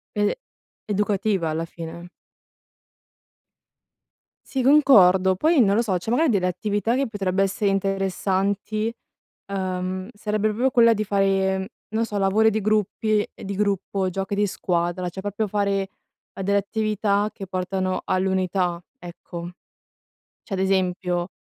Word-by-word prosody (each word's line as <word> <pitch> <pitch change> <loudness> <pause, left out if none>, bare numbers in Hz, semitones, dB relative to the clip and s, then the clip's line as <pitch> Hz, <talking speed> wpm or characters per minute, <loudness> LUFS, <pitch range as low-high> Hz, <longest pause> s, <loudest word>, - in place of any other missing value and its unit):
Ed 205 0 +2
è - - -3 0.5
educativa 200 -3 0
alla 160 +1 -2
fine. 170 +1 -9 2.4
Si 265 -2 0
concordo. 190 -10 +6
Poi 310 - +3
non 200 -1 +3
lo 230 - +2
so, 195 -5 0
cioè 220 - -6
magari 305 +6 +3
delle 185 -3 +1
attività 205 +5 -1
che 275 +1 +1
potrebbe 195 -3 0
essere 200 +1 0
interessanti, 195 +2 -1 0.6
uhm, 185 +1 -3
sarebbe 215 0 -1
proprio 250 +5 +1
quella 230 -1 +6
di 215 - -1
fare, 195 -1 +1
mhmm, 190 - -3 0.2
non 220 +1 0
so, 205 -2 -4
lavori 205 +3 +3
di 220 0 -1
gruppi 215 0 +1
ehm, - - -10
di 200 0 -4
gruppo, 195 -1 0
giochi 195 +2 -4
di 205 0 +2
squadra, 175 0 -1
cioè 190 +2 -8
proprio 205 +2 -2
fare, 200 -1 0 0.4
ehm, 195 - -6
delle 200 +1 +2
attività 210 0 0
che 195 - -8
portano 185 0 -2
all'unità, 185 -2 0 0.2
ecco. 175 0 -8 0.9
Cioè 200 - -6
ad 190 - -2
esempio 185 -2 0
195 Hz, 140 wpm, -23 LUFS, 185-210 Hz, 2.4 s, concordo